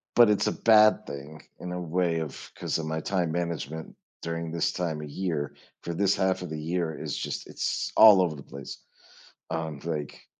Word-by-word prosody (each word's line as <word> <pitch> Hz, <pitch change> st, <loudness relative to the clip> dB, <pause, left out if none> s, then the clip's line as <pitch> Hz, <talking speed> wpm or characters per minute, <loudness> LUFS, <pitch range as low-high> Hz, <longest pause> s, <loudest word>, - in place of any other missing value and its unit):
but 120 Hz, -2 st, +7 dB
it's 105 Hz, -, +2 dB
a -, -, +2 dB
bad 110 Hz, -1 st, +5 dB
thing 70 Hz, +2 st, -8 dB, 0.2 s
in 90 Hz, -, -6 dB
a 90 Hz, -, -3 dB
way 85 Hz, 0 st, 0 dB
of 80 Hz, -3 st, -3 dB, 0.2 s
‘cause -, -, -2 dB
of 80 Hz, -, -3 dB
my 80 Hz, 0 st, -2 dB
time 90 Hz, -4 st, 0 dB
management 80 Hz, -2 st, -4 dB, 0.3 s
during 85 Hz, 0 st, -4 dB
this 85 Hz, -1 st, 0 dB
time 80 Hz, -4 st, -2 dB
of 75 Hz, -, -7 dB
year 80 Hz, -3 st, -3 dB, 0.3 s
for 85 Hz, -, -4 dB
this 100 Hz, +3 st, +2 dB
half 95 Hz, 0 st, +1 dB
of 90 Hz, -, -5 dB
the 80 Hz, 0 st, -4 dB
year, 85 Hz, +1 st, -1 dB
it's -, -, -4 dB
just, -, -, -4 dB
it's -, -, -2 dB
all 105 Hz, -4 st, +9 dB
over 85 Hz, -4 st, 0 dB
the 70 Hz, -, -10 dB
place, 70 Hz, +1 st, -9 dB, 0.7 s
um, 80 Hz, -3 st, -3 dB
like 75 Hz, -4 st, -4 dB
85 Hz, 195 wpm, -27 LUFS, 80-90 Hz, 0.7 s, all